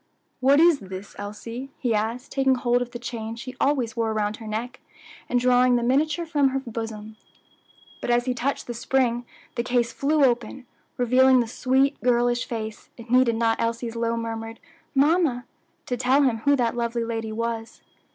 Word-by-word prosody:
"What 275 +3 +5
is 335 -3 +5
this, 190 -1 -9
Elsie?" 230 +6 -7
he 245 -3 0
asked, 225 +4 -2
taking 270 -1 +2
hold 245 0 +1
of 245 - -3
the 240 - -7
chain 230 -2 -5
she 250 +2 -8
always 255 -5 +1
wore 230 -1 0
around 210 0 -1
her 220 - -10
neck, 225 +4 -4 0.5
and 245 - +2
drawing 250 0 +4
the 240 - +1
miniature 295 +7 +1
from 290 -4 +2
her 270 +1 -1
bosom. 220 -3 -7 0.8
But - - -4
as 240 0 +2
he 255 - 0
touched 255 +3 -2
the 240 - -5
spring 240 0 0 0.3
the - - -1
case 240 -1 0
flew 295 +1 +2
open, 245 +1 -1 0.3
revealing 255 +1 +5
the 240 - +1
sweet, 265 +4 +1
girlish 240 0 +2
face, 220 -2 -6
it 230 0 -11
needed 250 -2 +4
not 225 0 +1
Elsie's 230 0 -2
low 230 0 -1
murmured 225 0 -5 0.4
"Mamma" 285 -3 +2 0.4
to 250 - -2
tell 260 +4 +3
him 250 -4 +2
who 285 +6 +3
that 240 -3 0
lovely 235 0 -1
lady 225 -1 -3
was. 230 0 -4
240 Hz, 180 wpm, -24 LUFS, 230-260 Hz, 0.8 s, What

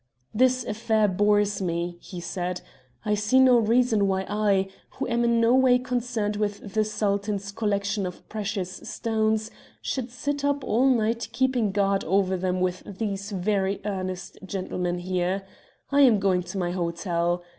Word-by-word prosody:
"'This 255 +2 +3
affair 220 0 +1
bores 205 +1 +2
me,' 170 -1 -2
he 180 - -8
said. 180 0 -3 0.4
'I 210 - +1
see 210 +5 +3
no 255 -2 +6
reason 225 -2 +3
why 190 0 0
I, 200 -2 +1 0.3
who 265 - -2
am 235 0 +1
in 235 0 +3
no 230 +1 +4
way 260 -1 +5
concerned 240 -4 -2
with 205 -1 -3
the 215 - +3
Sultan's 200 -1 -1
collection 200 -2 -1
of 180 - -10
precious 200 -3 -4
stones, 220 -1 -1 0.3
should 255 -2 -3
sit 285 +4 -3
up 285 0 +1
all 245 +5 +2
night 230 -2 +1
keeping 255 -5 +1
guard 195 0 +1
over 190 +1 +2
them 185 0 -1
with 185 0 0 0.2
these 200 -2 -3
very 195 0 0
earnest 185 -2 -4
gentlemen 185 -2 -3
here. 185 +2 -1 0.5
I 285 0 +4
am 245 -6 +6
going 190 -2 +2
to 180 +3 -7
my 175 -2 -1
hotel. 175 0 -1
205 Hz, 155 wpm, -26 LUFS, 190-230 Hz, 0.5 s, no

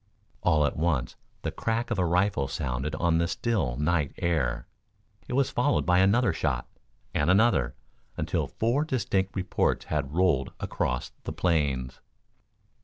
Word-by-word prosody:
All 75 -3 +3
at - - -1
once 75 -7 0 0.3
the - - -1
crack 115 +2 -2
of 110 - 0
a 90 - +3
rifle 90 -5 +1
sounded 65 +3 -3
on 85 0 +2
the 85 - +1
still 90 - -1
night 75 -1 +1
air. 80 -10 0 0.6
It - - -5
was 135 0 +2
followed 135 +4 +1
by 90 0 +4
another 105 +6 +4
shot, 65 -6 -1 0.5
and 75 +3 +1
another, 95 - +3 0.4
until - - -1
four 120 +6 0
distinct 100 -9 -1
reports 95 -1 0
had 75 -1 -2
rolled 85 -7 +2
across 60 0 -2
the - - -4
plains. 70 -7 0
85 Hz, 145 wpm, -27 LUFS, 70-100 Hz, 0.6 s, by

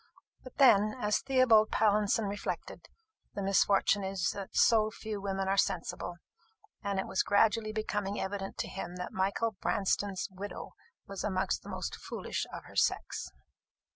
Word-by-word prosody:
But 255 - -12
then, 215 -7 +5
as 210 -2 +1
Theobald 255 -5 +4
Pallinson 210 0 +2
reflected, 200 +1 -5 0.5
the 200 - -3
misfortune 195 +1 +3
is 190 -3 -1
that 195 -1 -8
so 215 -2 +5
few 215 -1 -6
women 195 -1 -2
are 195 +1 +1
sensible; 175 0 -1 0.7
and 200 -2 -2
it 190 - 0
was 190 - 0
gradually 215 +1 +2
becoming 205 -2 -2
evident 195 0 -4
to - - -2
him 180 -2 -6
that 180 0 -6
Michael 200 +4 0
Branston's 195 0 0
widow 195 +2 -7 0.3
was 195 -1 -6
amongst 185 - 0
the - - -11
most - - -4
foolish - - -4
of - - -7
her - - -15
sex. - - 0
200 Hz, 150 wpm, -31 LUFS, 195-215 Hz, 0.7 s, then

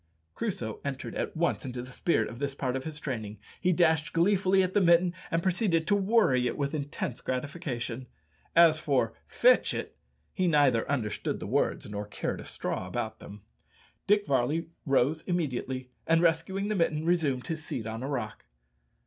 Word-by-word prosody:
Crusoe 150 - -3
entered 140 -2 -4
at - - -3
once 170 +1 0
into 125 -2 -5
the 125 - -10
spirit 170 +6 +1
of 120 - -9
this 140 -1 -2
part 130 -2 -2
of 130 - -4
his 155 -2 -5
training; 110 -7 -4 0.2
he 180 - +2
dashed 160 -2 +2
gleefully 190 +2 +3
at 185 0 -2
the 205 - +4
mitten, 175 0 +4 0.2
and 165 0 0
proceeded 185 -3 +1
to 205 - +3
worry 195 - +3
it - - -3
with 140 +1 -1
intense 145 -1 -4
gratification. 130 -3 -4 0.5
As 165 -2 +7
for 140 -4 +1
"Fetch - - +4
it," - - -5 0.4
he 185 -2 +1
neither 140 -8 +3
understood 120 -7 -1
the - - -6
words - - 0
nor 105 0 -5
cared - - -3
a - - -10
straw - - -3
about - - -4
them. 100 0 -11 0.6
Dick 205 0 +4
Varley 145 +5 0 0.2
rose 140 +3 +2
immediately, 130 -7 -2 0.2
and 165 +1 +4
rescuing 175 +5 +1
the 215 - 0
mitten, 160 -3 +1
resumed 155 -7 +1
his 160 -2 -4
seat 115 - -4
on 110 +1 -5
a 135 - -3
rock. 120 - -4
150 Hz, 175 wpm, -29 LUFS, 125-175 Hz, 0.6 s, As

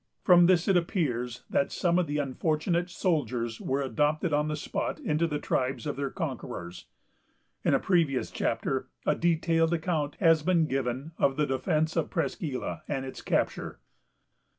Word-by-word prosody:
From 175 -1 +7
this 180 -2 +3
it 195 - +4
appears 125 - -1
that 140 - 0
some 175 0 +2
of 175 - 0
the 145 +1 -2
unfortunate 155 +5 0
soldiers 125 - -1
were 135 +1 -1
adopted 150 +4 0
on 150 +1 +2
the 155 - -1
spot 150 - -3
into 155 +2 0
the 150 -2 -2
tribes 130 -3 -1
of 145 - -2
their 140 0 -2
conquerors. 125 - -6 0.8
In - - +3
a - - +3
previous 165 -8 +1
chapter, - - -1 0.2
a - - +3
detailed 165 0 +2
account 160 -3 -1
has 165 -4 +4
been 170 0 +3
given 135 +1 -2
of 135 - +3
the 150 - +2
defence 155 +4 0
of 165 - 0
Presqu' 145 -6 -2
Isle, - - -4
and 135 -2 -2
its 130 - -7
capture. - - -1
150 Hz, 165 wpm, -28 LUFS, 135-170 Hz, 0.8 s, From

